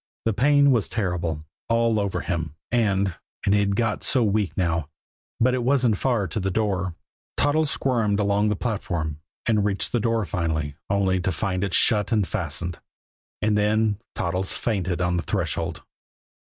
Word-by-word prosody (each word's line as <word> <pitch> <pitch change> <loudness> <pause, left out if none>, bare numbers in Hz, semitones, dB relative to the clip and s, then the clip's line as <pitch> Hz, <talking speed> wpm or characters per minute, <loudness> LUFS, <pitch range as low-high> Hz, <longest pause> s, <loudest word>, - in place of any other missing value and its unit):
The 115 - +2
pain 140 +5 +5
was 115 -6 +1
terrible 85 -7 -2 0.2
all 115 -1 +3
over 100 -2 -1
him. 80 -4 -3 0.2
And 100 -5 +2 0.3
and 100 - +3
he'd 100 -1 +2
got 110 -1 0
so 125 - +4
weak 105 -2 0
now 85 -5 0 0.5
but 125 +2 +3
it 130 - 0
wasn't 125 -4 +2
far 120 -7 +1
to 110 - -2
the 95 -1 -1
door. 95 -4 -1 0.4
Toddles 145 +2 +2
squirmed 115 -8 +1
along 100 +1 +2
the 105 - +1
platform, 85 -9 -3 0.3
and 110 -3 +2
reached 100 -1 0
the 120 - +1
door 115 -1 +1
finally 80 -5 -2
only 95 -1 +2
to 90 +1 0
find 95 +1 -1
it 100 -3 -1
shut 105 0 +3
and 105 -5 +2
fastened. 85 -2 -3 0.6
And 105 0 +3
then 105 0 +2 0.2
Toddles 90 +2 -1
fainted 95 -5 -1
on 90 0 +1
the - - 0
threshold. - - -2
100 Hz, 165 wpm, -24 LUFS, 90-115 Hz, 0.6 s, pain